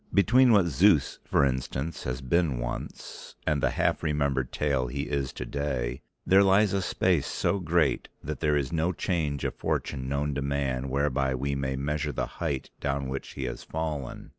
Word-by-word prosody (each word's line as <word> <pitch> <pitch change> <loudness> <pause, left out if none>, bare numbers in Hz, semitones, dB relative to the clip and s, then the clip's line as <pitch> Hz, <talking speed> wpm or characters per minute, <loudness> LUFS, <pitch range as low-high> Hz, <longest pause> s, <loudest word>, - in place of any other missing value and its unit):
Between 120 +6 +6
what 100 -5 +5
Zeus, 85 0 +3
for 70 - +3
instance, 65 +4 -3
has 65 +1 -3
been 70 +1 +1
once - - -6
and 75 -3 +1
the - - +3
half - - 0
remembered 70 -4 0
tale 70 -4 0
he 70 +3 -3
is 70 -3 -2
today 65 0 -3 0.2
there 95 +1 +6
lies 100 +1 +4
a 100 - +1
space - - +1
so 100 - 0
great 85 -3 +1
that 75 +2 -4
there 75 -2 +2
is 70 +2 -2
no 85 +3 +1
change 80 -6 -1
of - - -1
fortune 65 -2 -2
known 70 +1 0
to 70 - -2
man 70 -2 -1
whereby 70 -1 +1
we 70 +2 -2
may 65 -1 -1
measure 75 +2 -1
the 65 - -2 0.2
height 75 -6 -2
down 70 -1 -2
which 65 +1 -5
he 70 - -5
has 60 -2 -4
fallen. 75 -4 -4
70 Hz, 180 wpm, -28 LUFS, 65-80 Hz, 0.2 s, Between